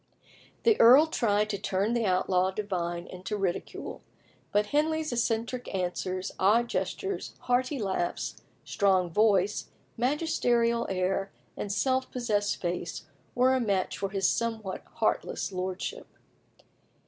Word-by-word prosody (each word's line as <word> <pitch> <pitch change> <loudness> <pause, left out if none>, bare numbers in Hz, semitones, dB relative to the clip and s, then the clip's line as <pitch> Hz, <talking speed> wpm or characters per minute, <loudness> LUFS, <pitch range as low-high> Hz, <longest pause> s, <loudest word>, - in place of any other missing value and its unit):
The 450 -2 +4
earl 255 +7 +9
tried 215 -9 +1
to 200 - -3
turn 200 +2 0
the 235 -3 +1
outlaw 185 0 +2
divine 175 -4 -3
into 185 +4 -5
ridicule; 190 -3 -3 0.5
but 205 +1 +3
Henley's 310 -1 +1
eccentric 235 +1 -1
answers, 185 0 -2
odd 230 +5 +4
gestures, 395 -1 -3
hearty 255 +3 +1
laughs, 190 -6 -2 0.2
strong 190 -4 +2
voice, 210 0 +2 0.3
magisterial 240 -4 +1
air, 190 +1 -1 0.2
and 205 - -4
self 260 +5 +1
possessed 210 -5 -1
face 175 -2 -3 0.3
were 255 +1 +4
a 260 - +2
match 200 -6 0
for 195 - -1
his 195 -1 +1
somewhat 225 -4 -2
heartless - - -1
lordship. 185 0 -4
210 Hz, 120 wpm, -28 LUFS, 190-240 Hz, 0.5 s, earl